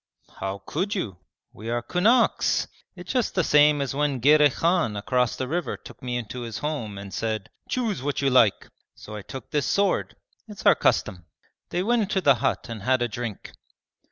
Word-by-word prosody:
'How 95 0 -4
could 195 +7 -2
you? 100 - -4 0.3
We 110 +3 -8
are 120 0 -1
kunaks. 225 - +2 0.3
It's 180 +3 -7
just 250 -4 0
the 185 - +2
same 150 -1 +5
as 135 - -4
when 145 -1 0
Girey 150 +3 +6
Khan 165 - +1
across 125 +4 0
the 130 - -3
river 170 +5 -2
took - - -14
me 125 -1 -2
into 120 +1 -6
his 115 -3 -5
home 135 -10 -4
and 100 -1 -8
said, 110 0 -3 0.2
"Choose 225 - -1
what 145 +1 -2
you 140 -1 +1
like!" 115 -5 +4 0.3
So 105 - -10
I 105 - -6
took 130 +4 -9
this 145 -1 0
sword. 200 -1 +1 0.3
It's 210 -2 -10
our - - +8
custom.' 90 -3 0 0.4
They 175 +1 -1
went 235 +3 +2
into 200 -1 0
the 145 -7 +5
hut 135 - 0
and 115 -3 -6
had 130 +3 +2
a - - +1
drink. 115 -2 -6
135 Hz, 190 wpm, -25 LUFS, 115-175 Hz, 0.4 s, our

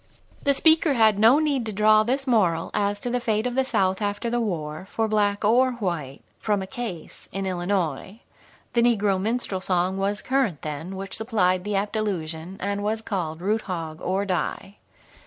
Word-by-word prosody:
"'" - - -29
The 280 0 +3
speaker 315 0 +4
had 220 -3 +4
no 230 +6 +7
need 295 -5 +1
to - - -2
draw 215 +1 +5
this 260 +5 -1
moral 185 -10 +2
as 205 0 0
to 245 - -3
the 250 - +1
fate 220 -2 0
of 250 - -1
the 265 +1 +2
South 195 -6 0
after 205 +3 -2
the 240 0 +1
war, 160 -4 -4
for 225 -1 0
black 205 -1 +1
or 250 +4 +4
white, 170 - -4 0.2
from 205 -3 0
a - - -5
Case 220 -6 -7
in 195 0 -3
Illinois; 185 0 -2 0.5
the 235 - +3
negro 205 -5 +2
minstrel 215 -3 -1
song 185 0 0
was 200 +1 -1
current 255 - 0
then 155 +5 -5
which 195 0 -5
supplied 185 -5 +1
the 205 0 -2
apt 205 +2 -1
allusion, 175 -4 -3
and 200 +1 -2
was 220 +2 -2
called 170 -7 -3
"Root, 215 +4 0
Hog, 165 -2 -4
or 190 +2 -1
Die." 195 +1 -3
205 Hz, 190 wpm, -24 LUFS, 185-225 Hz, 0.5 s, no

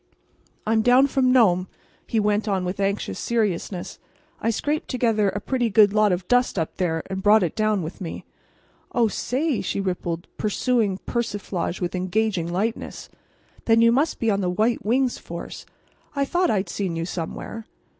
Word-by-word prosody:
"I'm 220 +1 +2
down 250 +4 +5
from 265 -2 +2
Nome," 190 -8 +4 0.4
he 225 - +1
went 210 +1 +1
on 190 -3 0
with 180 +2 -4
anxious 200 +1 -1
seriousness. 200 -5 -2 0.4
"I 230 - +1
scraped 295 +7 -1
together 225 -5 +2
a 205 - -3
pretty 245 +2 0
good 205 -1 +5
lot 215 -1 +4
of 180 0 -2
dust 245 -3 +2
up 160 -2 -2
there, 165 -4 0
and 190 0 -4
brought 210 +1 +5
it 170 - -2
down 215 -3 +1
with 160 +5 -7
me." 170 - -6 0.7
"Oh, 240 -3 +3
say!" 260 +5 -1
she - - -2
rippled, 175 -3 -3
pursuing 215 -2 +1
persiflage 205 -6 -3
with 175 0 -2
engaging 185 -1 -1
lightness, 215 +6 -3 0.6
"then 225 0 +4
you 230 0 +6
must 285 +6 +1
be 225 -1 +2
on 200 0 0
the 180 - 0
White 215 +6 +1
Wings 250 +3 +1
force. - - -8 0.5
I 280 0 +1
thought 350 +4 +1
I'd 195 -2 +1
seen 180 -1 -3
you 165 0 -2
somewhere." 185 +6 -6
210 Hz, 170 wpm, -24 LUFS, 185-235 Hz, 0.7 s, you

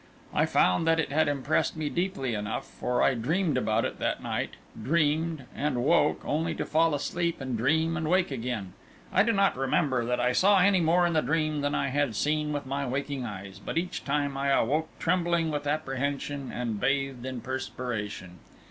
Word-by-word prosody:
I - - +2
found 90 - +3
that 165 0 +4
it 155 - -1
had 155 +2 +3
impressed 145 +2 0
me 155 -1 -2
deeply 170 - -1
enough, 105 0 -3
for 125 0 -1
I - - +4
dreamed 155 +7 0
about 110 -4 +1
it - - -4
that - - -1
night - - -3 0.3
dreamed, 155 +2 +1
and 135 -4 -1
woke, 170 +3 +3
only 160 +2 -1
to - - -3
fall 160 0 +2
asleep 170 +4 -2
and 130 -2 -3
dream 160 +8 +1
and 155 -1 -2
wake 185 -2 +2
again. 115 -7 -4 0.4
I 190 - +5
do 225 +3 +3
not 200 -2 +3
remember 130 -1 +1
that 125 +1 0
I 125 +1 +2
saw 195 +9 +4
any 190 0 +4
more 170 +2 +4
in 170 - +1
the 155 - +3
dream 155 -1 0
than 145 0 0
I - - 0
had 140 -4 0
seen 150 +4 0
with 145 -1 -3
my 140 +1 -2
waking 135 0 -3
eyes, 100 -1 -8
but - - -4
each 175 +2 -2
time 140 -1 -1
I 140 0 -1
awoke 150 +4 +2
trembling 170 -2 +1
with 145 -1 -3
apprehension 140 -1 -2
and 115 -4 -3
bathed 135 -1 0
in 130 -1 -4
perspiration. 115 -8 -5
145 Hz, 190 wpm, -28 LUFS, 125-160 Hz, 0.4 s, I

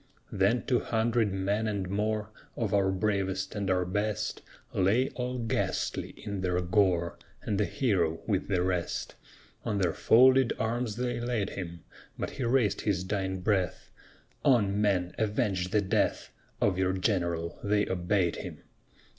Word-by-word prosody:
Then 100 +6 +2
two 125 - +2
hundred 115 -1 +1
men 100 +3 0
and 100 -3 -2
more, 105 +2 -1 0.2
Of 110 -4 -2
our 100 -1 +3
bravest 95 -1 -1
and 100 -3 -2
our 90 -1 +2
best, 105 +2 -2 0.3
Lay 110 +8 +2
all 125 0 -4
ghastly 115 -2 -2
in 100 -2 -3
their 90 -1 +1
gore, 90 -1 +1 0.2
And 105 -1 -1
the 105 - +3
hero 95 - 0
with 100 -4 0
the 95 -3 +1
rest. 90 -2 -2 0.5
On 105 - -1
their 90 -4 +1
folded 130 +5 +5
arms 115 0 -1
they 125 0 -2
laid 120 -4 -1
him; 85 -3 -6 0.3
But - - -3
he 135 - -4
raised 115 -5 +2
his 95 -4 0
dying 95 -1 -2
breath: 95 -2 0 0.5
"On, 105 -7 +3
men, 90 -4 +1
avenge 105 -4 0
the 105 +2 +2
death 95 - 0 0.3
Of 95 -2 +2
your 95 0 +2
general!" 85 -4 -1
They 105 0 +2
obeyed 90 -1 0
him. - - -8
100 Hz, 150 wpm, -29 LUFS, 95-110 Hz, 0.5 s, folded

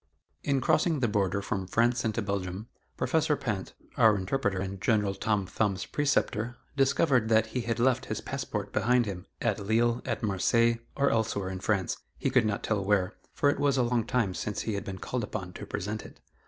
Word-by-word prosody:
In 135 -2 +1
crossing 160 +1 +2
the 125 - +2
border 100 -2 0
from 95 -2 -2
France 120 +4 +2
into 110 0 -1
Belgium, 100 +1 -3 0.3
Professor 150 +3 +1
Pinte, 105 -9 -3 0.2
our 110 -2 +6
interpreter 100 +1 -1
and 95 +1 -4
General 105 -4 +2
Tom 105 -1 0
Thumb's 95 0 -1
preceptor, 120 -5 0 0.2
discovered 135 -3 +3
that 110 0 +4
he 125 - 0
had 115 -1 -2
left 125 +1 +2
his 110 - -2
passport 105 -7 -4
behind 125 +1 +3
him 95 -2 -6 0.2
at 110 -4 +1
Lille, 115 +4 +1
at 115 -3 -3
Marseilles, 115 +4 +2 0.2
or 140 0 +2
elsewhere 105 -4 0
in 95 - -5
France, 95 -2 0 0.2
he - - -1
could 110 - +4
not 100 - -2
tell 105 -3 0
where, 95 -1 +2 0.2
for 145 - +3
it - - -4
was 140 -1 +2
a 125 - +4
long 120 -1 +1
time 115 -6 0
since 105 +2 -3
he 110 - -2
had 100 -1 -2
been 95 -1 -5
called 125 +4 -3
upon 95 -3 -5
to - - -8
present 105 +3 -3
it. - - -13
110 Hz, 195 wpm, -29 LUFS, 100-125 Hz, 0.3 s, our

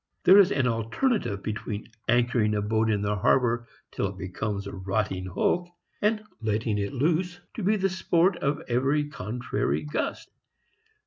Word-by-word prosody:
There 195 +2 +8
is 195 -1 +6
an 130 - +1
alternative 115 - 0
between 105 -1 -4 0.2
anchoring 120 -2 +2
a 105 - 0
boat 110 +1 +1
in 105 -2 +1
the 105 0 0
harbor 120 +3 +2 0.2
till - - -1
it - - -8
becomes 100 +2 -4
a 100 - -6
rotting 95 -1 -2
hulk 175 - 0 0.3
and 215 +1 +1 0.2
letting 110 -1 0
it 100 +3 -2
loose 170 +6 0
to 230 - -5
be 210 +3 +3
the 195 -2 +1
sport 185 -1 +2
of 145 +1 -1
every 135 +5 +1
contrary 125 -2 -2
gust. 150 0 -3
120 Hz, 155 wpm, -27 LUFS, 105-165 Hz, 0.3 s, There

